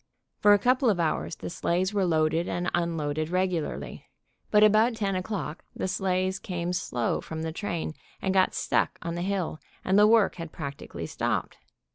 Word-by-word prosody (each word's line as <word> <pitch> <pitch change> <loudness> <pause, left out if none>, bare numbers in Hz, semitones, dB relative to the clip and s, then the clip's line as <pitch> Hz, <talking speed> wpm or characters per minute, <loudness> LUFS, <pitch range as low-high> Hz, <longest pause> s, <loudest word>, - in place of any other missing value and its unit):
For 205 - +6
a - - +6
couple 255 +3 +3
of 195 -5 +1
hours 165 0 0
the - - -6
sleighs 180 +4 0
were 200 -2 +2
loaded 160 +1 +2
and 175 +1 -1
unloaded 155 -3 -1
regularly, 180 -3 -2 0.4
but 210 0 +5
about 215 +3 +5
10 200 -3 -1
o'clock 185 -3 -4
the - - -2
sleighs 185 0 0
came 175 -1 -3
slow 125 -9 -1
from 160 0 -6
the 160 - -2
train, 170 -3 -3 0.3
and 190 - 0
got 190 -1 +3
stuck - - 0
on 170 -1 -3
the 175 - -3
hill, 185 -4 -2 0.3
and 190 +2 +4
the 210 - +7
work 220 -4 +4
had 165 -2 -6
practically 140 -4 -6
stopped. - - -2
180 Hz, 175 wpm, -27 LUFS, 165-200 Hz, 0.4 s, the